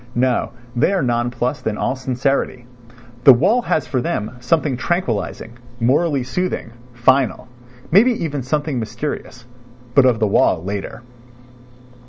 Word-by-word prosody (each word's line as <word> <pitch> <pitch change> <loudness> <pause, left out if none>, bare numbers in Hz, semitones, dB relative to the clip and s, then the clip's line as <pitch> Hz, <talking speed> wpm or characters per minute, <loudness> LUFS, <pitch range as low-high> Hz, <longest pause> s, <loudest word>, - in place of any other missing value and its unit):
No, 125 0 +1 0.3
they 120 +11 +2
are 190 - +1
nonplussed 120 +2 -1
in 105 -1 -1
all 130 - -1
sincerity. 130 -1 -1 0.6
The 135 - +10
wall 200 - +3
has 155 - 0
for 125 0 -1
them 105 -3 -2
something 145 +2 +1
tranquillising, 120 - -3 0.2
morally 140 +3 +2
soothing, 155 -1 -3 0.2
final—maybe 125 - +1
even 145 -4 -3
something 145 +1 -2
mysterious... 120 0 -5 0.5
but 140 -1 +6
of 120 -4 +3
the 110 - +2
wall 95 -4 +2
later.) 100 +4 -5
125 Hz, 125 wpm, -19 LUFS, 120-145 Hz, 0.6 s, The